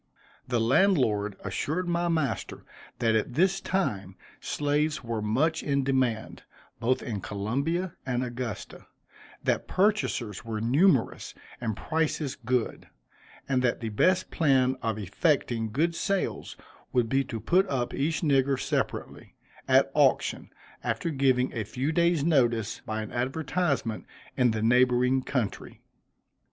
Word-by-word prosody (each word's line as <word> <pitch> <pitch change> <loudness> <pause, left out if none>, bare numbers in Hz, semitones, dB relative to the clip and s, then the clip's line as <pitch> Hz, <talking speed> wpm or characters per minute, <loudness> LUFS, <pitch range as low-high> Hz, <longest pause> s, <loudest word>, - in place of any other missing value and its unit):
The 120 -2 +1
landlord 115 - +2
assured 180 +5 -2
my 175 0 0
master 155 -8 -2 0.3
that 115 -1 +2
at 110 +3 -1
this 190 +4 +2
time 100 - -2 0.2
slaves 150 0 -1
were 115 -2 -3
much 145 +10 +1
in 140 -1 0
demand, 130 -5 -1 0.4
both 125 +2 +1
in 105 -5 -4
Columbia 140 - -2
and 125 -1 -1
Augusta; 120 -3 -6 0.6
that - - 0
purchasers 185 - 0
were 110 -2 -4
numerous 135 - +2 0.3
and 110 -4 -2
prices 155 -3 -1
good; 125 -2 -2 0.6
and 130 -2 +1
that 125 -2 +1
the 115 - -3
best 185 - +2
plan 130 -4 +3
of 110 -2 -1
effecting 115 - 0
good 165 +8 +1
sales 195 +3 -2 0.3
would 125 -2 +2
be 135 +4 +2
to 115 -3 -5
put 185 - +2
up 125 -3 -1
each 150 +2 -1
nigger 135 -4 +2
separately, - - -3 0.3
at - - +4
auction, - - +2 0.3
after 170 - -1
giving 130 -3 +2
a 115 - -2
few 130 +8 -2
days' 170 -2 +2
notice, 120 -9 +1
by 110 0 -2
an 110 - -8
advertisement, 135 -1 -1 0.3
in 125 -2 +3
the 110 -1 -1
neighboring 125 +2 +3
country. 125 -6 -3
130 Hz, 130 wpm, -27 LUFS, 115-155 Hz, 0.6 s, at